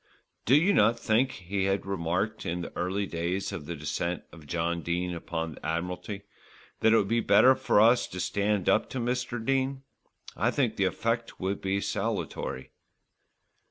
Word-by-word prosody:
"Do 130 - +5
you 180 +7 +4
not 115 - +4
think," 115 +3 +2
he 95 0 -3
had 95 0 0
remarked 95 +3 -1
in 85 +1 -2
the - - -8
early 95 +3 -1
days 85 +2 -2
of 75 - -6
the 85 - -4
descent 85 +4 -3
of 80 -3 -14
John 85 +2 -1
Dene 90 +2 -2
upon 80 -1 -4
the - - -15
Admiralty, 90 +5 -3 0.6
"that 110 - +4
it 115 - +6
would 100 - +2
be 115 +3 +2
better 130 +3 +6
for 115 - +2
us 115 +3 +5
to 90 - -7
stand 100 0 0
up - - +3
to 130 - -4
Mr. 120 -1 -2
Dene? 135 +1 0 0.5
I 115 - +2
think 125 -4 0
the 100 - +1
effect 115 +5 -2
would 95 +1 -2
be 95 +1 0
salutary." 65 - -3
100 Hz, 175 wpm, -28 LUFS, 85-115 Hz, 0.6 s, it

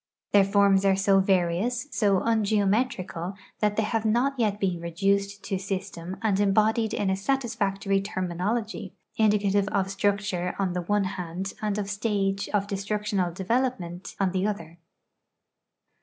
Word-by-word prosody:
Their 200 -1 +6
forms 200 -1 +4
are 195 -1 +4
so 195 0 +4
various, 190 +7 +1
so 200 -3 +2
ungeometrical, 205 -4 0 0.2
that 210 -1 +1
they 220 - +1
have 220 +1 -1
not 240 +5 +2
yet 210 -3 +1
been 185 -4 0
reduced 200 +4 0
to 195 -2 -2
system 190 -2 -5
and 205 -3 +2
embodied 215 +2 +2
in 195 -2 0
a - - +2
satisfactory 200 -4 0
terminology, 195 +2 -3 0.2
indicative 205 -2 +3
of 195 -2 0
structure 195 -2 -1
on 190 -3 0
the 180 - -1
one 205 +3 +1
hand 185 0 -4
and 210 -1 -1
of 205 -1 -2
stage 200 -1 -1
of 205 -1 +1
destructional 200 -2 -1
development 190 -2 -2
on 195 -2 +2
the 190 +2 0
other. 170 -5 -5
200 Hz, 140 wpm, -26 LUFS, 190-210 Hz, 0.2 s, Their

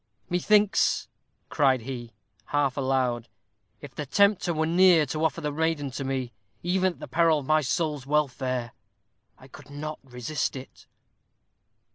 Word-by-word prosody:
"Methinks," 205 +3 +3 0.4
cried 135 -4 +2
he, 120 -1 -7 0.3
half 145 -3 0
aloud, 130 -4 0 0.5
"if 145 -2 -10
the 150 -2 -5
Tempter 200 +1 +3
were 160 -1 0
near 170 -1 +5
to 155 +3 -3
offer 160 +1 0
the 150 -1 -2
maiden 155 -2 -1
to 135 +2 -5
me, 130 -3 -3 0.3
even 185 +1 +1
at - - -23
the - - -8
peril 165 -1 +3
of 145 - -5
my 155 +2 +3
soul's 150 -1 -2
welfare, 130 -4 -1 0.7
I 130 - -15
could 135 - -14
not 155 +2 -6
resist 130 +3 -3
it." 130 0 -11
145 Hz, 145 wpm, -26 LUFS, 130-160 Hz, 0.7 s, near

